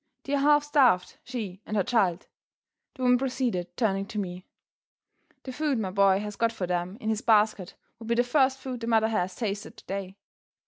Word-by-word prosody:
They're 280 0 0
half 295 +1 +4
starved, 265 -11 +2
she 210 -7 -6
and 215 - -3
her 195 - +3
child," 195 -6 +1 0.7
the 260 - -6
woman 250 0 +4
proceeded, 250 -9 -2
turning 195 -4 0
to 220 - -7
me. 180 -2 -5 1.0
"The 260 - -7
food 290 -1 0
my 195 -4 -2
boy 195 0 +4
has 210 -1 -6
got 230 +2 +1
for 210 -5 -4
them 180 +2 -2
in 220 - -3
his 220 0 0
basket 210 -4 +2 0.2
will 225 - -9
be 235 - +1
the 245 - +3
first 265 +1 +2
food 260 -2 -6
the 230 - -5
mother 220 -1 +3
has 180 -4 -1
tasted 205 -3 -4
today. 195 0 -6
220 Hz, 190 wpm, -27 LUFS, 195-250 Hz, 1.0 s, half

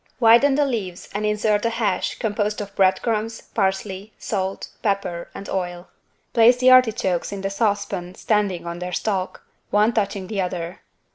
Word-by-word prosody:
Widen 240 +4 +6
the 290 0 +3
leaves 200 -9 -4
and 210 +1 -1
insert 210 0 +1
a 230 - +2
hash 220 -5 -1
composed 210 -1 -1
of 200 -1 -7
bread 190 -1 +4
crumbs, 225 0 -1
parsley, 195 0 -2
salt, 195 -2 -3
pepper 195 -5 -2
and 200 - -7
oil. 175 -2 -4 0.4
Place 235 +1 +6
the 255 +1 +5
artichokes 220 -8 +3
in 200 -1 -5
the 195 0 -2
saucepan 200 -4 -1
standing 205 -5 0
on 170 0 -5
their 180 0 -5
stalk, 190 -3 -2 0.3
one 210 +3 +3
touching 200 -3 -1
the 200 0 -2
other. 180 -1 -4
200 Hz, 160 wpm, -22 LUFS, 185-220 Hz, 0.4 s, Widen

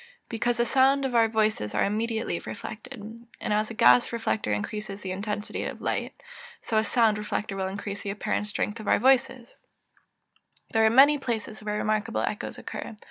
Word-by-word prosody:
_ - - -18 0.3
Because 235 +1 0
the 235 - +2
sounds 270 +3 +3
of 260 - -2
our 230 -1 +5
voices 215 - 0
are - - +3
immediately 220 -2 -1
reflected. 235 +4 -8 0.4
And - - -1
as 215 +1 +1
a 230 - -7
gas 125 - +5
reflector 225 - -1
increases 200 - -4
the 190 - -4
intensity 210 +2 -3
of - - -5
light, - - -2 0.5
so 220 -2 0
a - - +1
sound 220 -2 +2
reflector 210 -1 -3
will 190 -1 -2
increase 200 +1 -5
the 200 - -5
apparent 205 +1 -2
strength 210 +1 -2
of 215 - -8
our - - +5
voices. 260 0 +2 1.1
There 225 0 +3
are - - +5
many 280 +5 +6
places 225 -4 -4
where 210 0 -2
remarkable 215 0 0
echoes - - -3
occur. 220 - -7
215 Hz, 185 wpm, -27 LUFS, 210-235 Hz, 1.1 s, many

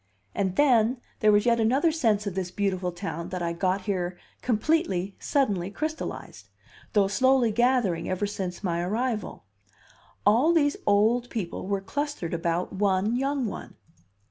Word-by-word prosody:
And 190 -2 -1
then, 245 -4 +3 0.2
there 215 -1 +5
was 205 +1 +3
yet 235 -1 +3
another 265 +9 +3
sense 220 -9 +1
of 200 - -3
this 185 -1 -3
beautiful 185 -1 -1
town 175 -1 -5
that 180 -1 -4
I 170 0 -1
got 185 +3 0
here 185 -3 -2 0.2
completely, 220 - 0
suddenly 205 - 0
crystallized, 310 +9 -5 0.4
though 205 -3 +4
slowly 255 +2 +3
gathering 240 -6 +1
ever 185 +2 -1
since 190 -2 -5
my 170 -2 0
arrival: 215 - -2 0.8
all 240 +11 +5
these 290 -3 +3
old 225 +4 +3
people 190 -4 -4
were 200 -1 -1
clustered 290 - -3
about 170 +2 -1
one 200 +2 +1
young 270 0 0
one. 215 - -6
205 Hz, 145 wpm, -26 LUFS, 185-245 Hz, 0.8 s, there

